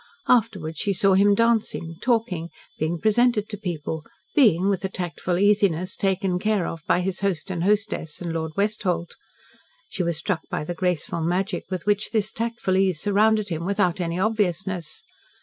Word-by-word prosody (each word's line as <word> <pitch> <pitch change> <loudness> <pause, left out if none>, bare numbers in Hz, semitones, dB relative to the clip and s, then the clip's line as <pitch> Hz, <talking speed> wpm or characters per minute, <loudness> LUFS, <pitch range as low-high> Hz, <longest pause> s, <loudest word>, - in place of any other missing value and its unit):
Afterwards 195 -10 +1
she 200 - +1
saw 195 +1 +3
him 200 +2 +5
dancing, 220 -7 0
talking, 220 -9 0 0.3
being 160 +2 -1
presented 220 +1 +3
to 210 - -4
people, 160 -5 -4 0.3
being, 195 - +4
with 195 -2 0
a 190 - -1
tactful 175 -1 -3
easiness, 195 -3 +2
taken 190 -2 0
care 210 -2 +1
of 165 - -5
by 180 - +3
his 190 0 -2
host 190 -2 -1
and 170 -2 -2
hostess, 205 -6 0
and 170 -2 -4
Lord 160 -1 -3
Westholt. 200 -4 -1 0.7
She - - -3
was 170 -2 0
struck 175 +1 -1
by - - -2
the 175 - -4
graceful 175 -1 -1
magic 180 +3 -1
with 185 -3 -4
which 205 0 +1
this 215 -2 0
tactful 230 -5 -1
ease 190 -4 +2
surrounded 210 +1 +2
him 165 -1 -3
without 185 -1 +1
any 170 0 -2
obviousness. 190 -5 -1
190 Hz, 165 wpm, -24 LUFS, 170-210 Hz, 0.7 s, him